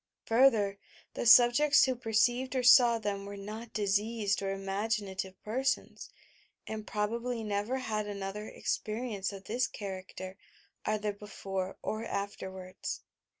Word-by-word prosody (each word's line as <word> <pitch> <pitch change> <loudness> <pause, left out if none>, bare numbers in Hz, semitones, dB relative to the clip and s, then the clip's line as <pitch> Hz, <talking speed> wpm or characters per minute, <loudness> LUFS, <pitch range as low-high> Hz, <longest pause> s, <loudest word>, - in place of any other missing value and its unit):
Further, 225 -5 +4 0.3
the - - -2
subjects 245 +6 +7
who 260 -1 0
perceived 245 +3 +1
or 255 - +1
saw 240 -1 +7
them 205 -2 -3
were 200 0 -7
not 215 +3 -7
diseased 205 +1 0
or 195 0 -1
imaginative 195 -1 -2
persona, 260 +5 -1 0.7
and 215 -1 -6
probably 230 +3 -2
never 210 +4 -1
had 215 -4 -2
another 200 +1 -5
experience 215 -3 -3
of 195 -1 -9
this 235 +4 0
char 195 -3 -5
acter 185 +1 -9 0.5
either 215 -1 0
before 195 -2 -5
or 215 +1 -2
afterwards. 190 -2 -5
210 Hz, 125 wpm, -31 LUFS, 200-235 Hz, 0.7 s, subjects